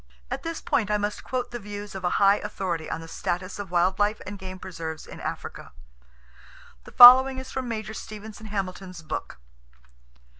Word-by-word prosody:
At - - -3
this 330 -1 -5
point 285 -11 0
I 210 - +2
must 205 0 -3
quote 250 -1 -3
the 240 - -5
views 205 -1 -8
of 190 -1 -7
a 175 - +2
high 200 0 +5
authority 185 -6 -4
on 165 - -4
the 165 - -10
status 180 +4 -4
of 200 -3 -6
wild 180 +2 +1
life 205 +1 +1
and 200 +1 -7
game 185 0 -7
preserves 165 -4 -7
in - - -11
Africa. - - -6 1.1
The - - -12
following 260 +2 +10
is 260 0 -7
from 260 -1 -4
Major 220 -2 -4
Stevenson 215 0 -9
Hamilton's 185 -3 -5
book. 155 - -5
205 Hz, 180 wpm, -26 LUFS, 185-220 Hz, 1.1 s, following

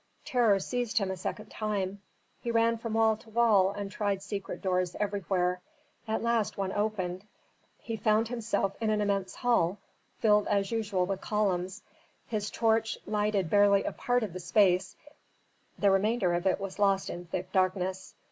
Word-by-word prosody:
Terror 230 -6 +3
seized 245 +3 -2
him 195 -3 +2
a - - -3
second 185 +3 -6
time. 200 -2 -2 0.4
He 235 - -5
ran 230 0 +2
from 230 -1 -4
wall 220 -1 +4
to 220 - -18
wall 215 -4 +4
and 200 0 -5
tried 200 -2 -1
secret 200 -1 -5
doors 185 -2 0
everywhere. 185 -3 0 0.5
At 220 +1 -1
last 235 -2 0
one 195 -1 -1
opened. 195 -3 -2 0.5
He 225 -1 -5
found 220 0 +2
himself 225 -4 -1
in 220 - +1
an 215 -1 +1
immense 200 -2 -1
hall, 210 -7 +1 0.4
filled 210 -2 +3
as 200 0 +1
usual 205 -5 0
with 195 0 -3
columns. 190 -2 -1 0.4
His 210 -2 -3
torch 225 -1 +1
lighted 210 -3 0
barely 205 -1 +5
a - - -2
part 245 -1 0
of 205 -6 -4
the 185 - -5
space, 180 +1 +2 0.8
the 200 -1 +3
remainder 195 -1 +2
of 175 +2 0
it 190 - +2
was 195 0 -6
lost 195 -1 +2
in 175 0 -7
thick 185 +2 -4
darkness. 185 0 -1
205 Hz, 165 wpm, -29 LUFS, 190-220 Hz, 0.8 s, barely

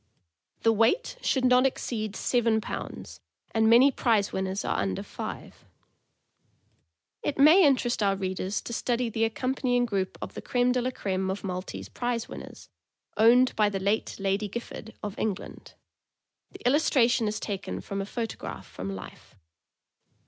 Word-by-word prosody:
The 225 - +5
weight 235 - +2
should 260 -2 +1
not 250 +1 +5
exceed 215 -5 -4
seven 230 -3 +2
pounds, 220 - -7 0.3
and 220 0 +3
many 250 +5 +7
prize 220 -6 +1
winners 190 +1 -2
are - - 0
under 95 -2 -2
five. - - -8 1.6
It 290 - -2
may 310 +7 +7
interest 250 -5 +2
our 200 -1 +3
readers 190 +1 -2
to 235 - -7
study 240 0 -1
the 225 +1 +1
accompanying 245 +1 0
group 195 -5 -2
of - - -7
the - - -7
creme 245 0 +1
de 250 0 +1
la 250 - 0
creme 190 -6 -2
of 190 +2 -3
Maltese 185 -1 -5
prize 240 -2 -2
winners, - - -10 0.5
owned 240 +4 +5
by 210 -1 +3
the 195 -1 -3
late 200 +3 -1
Lady 195 +2 0
Gifford, 225 +1 -7
of 205 -1 -5
England. 205 -4 -4 0.7
The - - -13
illustra 265 -2 +4
tion 235 -2 +1
is 215 +1 -2
taken 200 -2 -4
from 195 0 -4
a - - -3
photograph 230 0 -5
from 95 +1 -6
life. 95 - -11
225 Hz, 155 wpm, -27 LUFS, 200-245 Hz, 1.6 s, many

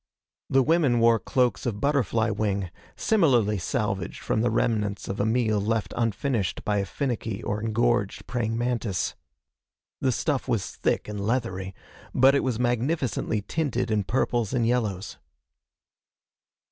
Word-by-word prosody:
The 135 0 +4
women 145 -5 +3
wore 115 0 +5
cloaks 125 -3 0
of 105 -4 -2
butterfly 115 -5 +1
wing, 100 -4 -1 0.2
similarly 125 - +3
salvaged - - -2
from 110 - 0
the 120 - +2
remnants 105 -3 0
of 100 - -4
a 100 - +2
meal 110 -3 +2
left 110 +1 -1
unfinished 115 -2 -1
by 105 -1 +1
a 100 - -2
finicky 115 -5 -3
or 105 +1 -2
engorged 115 -1 0
praying 115 -2 -2
mantis. 120 -5 -1 0.9
The 130 - +2
stuff 140 +1 -1
was 115 -6 -1
thick - - -1
and 105 -1 -4
leathery, 100 -5 -2 0.4
but 135 +2 +6
it 140 - +2
was 125 -4 0
magnificently 120 -2 0
tinted 125 -5 -1
in 105 -2 +2
purples 120 0 0
and 120 -3 +2
yellows. 105 - -1
115 Hz, 140 wpm, -26 LUFS, 105-125 Hz, 0.9 s, but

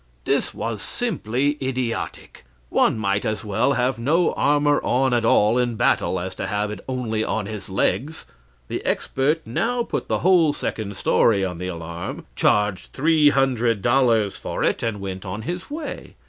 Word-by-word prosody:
This - - +1
was 115 -3 -4
simply 145 - -1
idiotic; 130 -3 -4 0.3
one - - +3
might 100 -2 0
as 110 +1 -2
well 110 +7 +1
have 125 -1 0
no 160 +9 +2
armor 145 0 +2
on 130 +1 +2
at 120 -1 +2
all 115 +1 +4
in 120 -2 0
battle 95 -3 +1
as 95 +1 -4
to - - -4
have 105 0 -1
it 105 - -6
only 115 -4 -1
on 110 -1 -2
his 105 -2 -7
legs. 140 +10 -1 0.4
The - - -4
expert 150 +5 0
now 235 - 0
put - - -4
the - - +1
whole 175 -5 +5
second 105 -7 -4
story 100 -4 +3
on 90 -2 -5
the 90 - -4
alarm, 85 -1 -6
charged 105 -2 +1
three 155 +1 +4
hundred 120 -6 +1
dollars 120 -5 +3
for - - -4
it, - - +1
and 115 -3 -2
went 95 -1 -5 0.2
his 175 +6 -5
way. 300 +1 -6
120 Hz, 165 wpm, -23 LUFS, 105-140 Hz, 0.4 s, whole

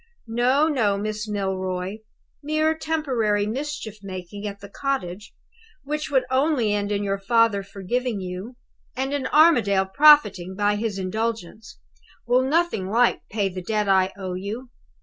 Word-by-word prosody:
No, 250 +6 +2
no, 225 -10 +1
Miss 215 +1 -4
Milroy; 190 -1 -2 0.4
mere 310 +2 +1
temporary 255 -11 0
mischief 230 -2 -5
making 195 +1 -7
at 200 0 -7
the 200 - -10
cottage, 205 -5 -4 0.5
which 300 +1 -3
would 265 -2 +2
only 260 -5 +2
end 205 0 -1
in 205 0 0
your 195 0 -1
father 230 -1 +3
forgiving 205 +4 -3
you, 185 +6 -6 0.4
and 265 +2 -2
in 280 -2 -1
Armadale 240 - +4
profiting 200 -7 +5
by 205 +1 +1
his 210 -1 -2
indulgence, 220 +2 -4 0.5
will 245 +2 +3
nothing 270 - 0
like 235 +3 +2
pay 205 -2 0
the 185 -1 -6
debt 210 +2 -1
I 190 -1 +3
owe 190 -2 -5
you. 215 +7 -6
215 Hz, 145 wpm, -24 LUFS, 195-260 Hz, 0.5 s, profiting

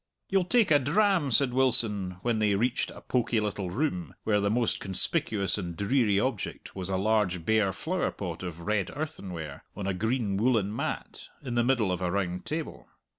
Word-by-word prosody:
"You'll 195 -2 +2
take 220 -1 +3
a 145 - +7
dram?" 175 +2 +2
said 130 +1 +3
Wilson, 105 -8 +2
when 120 -2 +1
they 105 -2 +3
reached 120 +5 +1
a - - -10
pokey 120 -2 +1
little 100 -3 -2
room 90 - -2
where 105 -2 +2
the 100 0 +1
most 115 +2 +1
conspicuous 100 +1 -1
and 85 -3 -5
dreary 105 -2 +2
object 115 -2 -3
was 95 -1 -4
a 95 - 0
large 95 -4 +1
bare 110 -2 +3
flowerpot 100 - -3
of 85 -2 -6
red 100 +1 0
earthenware, 90 - -5
on 100 - -4
a 95 - 0
green 110 +1 0
woollen 110 -2 +2
mat, 145 +5 -4 0.2
in 125 -3 -4
the 120 0 +3
middle 120 -6 +2
of 90 - -2
a 90 - 0
round 90 -1 -2
table. 155 0 -4
105 Hz, 180 wpm, -28 LUFS, 95-130 Hz, 0.2 s, a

